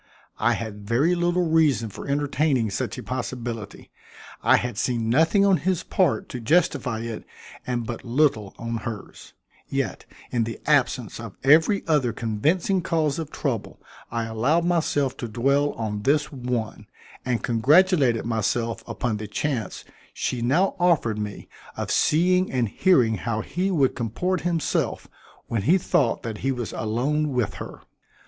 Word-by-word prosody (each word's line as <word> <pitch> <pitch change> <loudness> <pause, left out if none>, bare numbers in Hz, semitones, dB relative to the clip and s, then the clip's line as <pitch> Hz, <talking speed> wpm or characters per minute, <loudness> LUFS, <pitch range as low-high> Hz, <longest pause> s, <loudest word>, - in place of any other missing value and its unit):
I - - +3
had 105 -2 -6
very 135 +10 +3
little 175 0 +1
reason 150 -9 +2
for - - -8
entertaining 140 -4 +1
such 100 - -3
a - - -6
possibility. 120 -4 -5 0.5
I - - +5
had 120 -2 -3
seen 115 -3 0
nothing 165 - +4
on 195 -2 +4
his 180 +3 -1
part 185 - +1
to 125 - -5
justify 130 -3 +1
it 115 -2 -5 0.4
and 120 -2 -1
but 115 0 -6
little 120 -5 +1
on 115 0 -3
hers. 110 -1 -8 0.3
Yet - - -3 0.2
in 120 -2 +1
the 115 +1 -5
absence 130 -7 +1
of 115 -4 -8
every 160 +8 +5
other 145 -8 +2
convincing 155 - 0
cause 160 -3 0
of 160 -3 -4
trouble 130 -8 -3 0.3
I 115 0 -2
allowed 130 +10 +1
myself 155 -6 +1
to 120 - -4
dwell 140 +6 +1
on 105 -2 -3
this 145 +6 +1
one, 125 -5 -4 0.4
and 125 -2 -1
congratulated 135 - +3
myself 115 +1 -1
upon 120 -3 -2
the 105 0 -6
chance 120 +3 -3 0.3
she 125 - -2
now 155 +11 +2
offered 155 -12 +2
me 105 -1 -5 0.3
of - - -3
seeing 180 +4 +3
and 125 -3 +1
hearing 125 - +3
how 110 +2 -2
he 185 - -2
would 145 -8 +2
comport 155 - -1
himself 170 -2 -1 0.4
when 115 -3 -2
he 165 - +4
thought 140 -9 +1
that 110 -3 -5
he 135 - 0
was 120 -4 -4
alone 140 +7 -1
with 125 -5 0
her. - - -8
125 Hz, 155 wpm, -24 LUFS, 115-155 Hz, 0.5 s, I